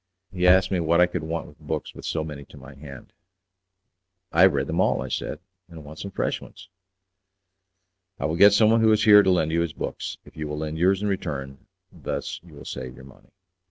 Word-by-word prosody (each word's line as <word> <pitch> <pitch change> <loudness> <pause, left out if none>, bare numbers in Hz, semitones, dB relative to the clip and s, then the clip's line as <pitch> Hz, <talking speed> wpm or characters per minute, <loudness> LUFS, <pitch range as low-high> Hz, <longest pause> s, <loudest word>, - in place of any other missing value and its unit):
He 90 -1 +1
asked 95 +1 +5
me 95 - +1
what 85 +1 +2
I 90 - +7
could 90 -1 -4
want 80 +1 -4
with - - -16
books - - -5
with - - -11
so 80 - -2
many 75 -2 -8
to 70 - -16
my 70 +1 -12
hand. 70 -2 -12 1.2
"I 85 - +3
have 95 -1 +7
read 70 -1 0
them 80 +5 -1
all," - - +2
I - - -7
said, - - -3 0.3
"and 80 -3 -11
want 80 +2 -11
some 100 - -6
fresh - - -2
ones." 95 -1 -14 1.5
"I - - -3
will 80 +2 -1
get 100 +3 +7
someone 110 +2 +4
who 110 -1 +5
is 105 0 +2
here 105 -1 +8
to 95 - +1
lend 80 -4 +2
you 85 +1 +1
his 85 -2 -2
books, - - -5
if - - -17
you 75 -1 -5
will 75 0 -5
lend 80 +1 -4
yours 95 +3 +2
in - - 0
return; 70 -9 -4 0.2
thus - - -5
you 80 -3 -16
will 70 - -12
save 65 -1 -7
your 65 - -13
money." 65 - -18
85 Hz, 230 wpm, -24 LUFS, 75-95 Hz, 1.5 s, here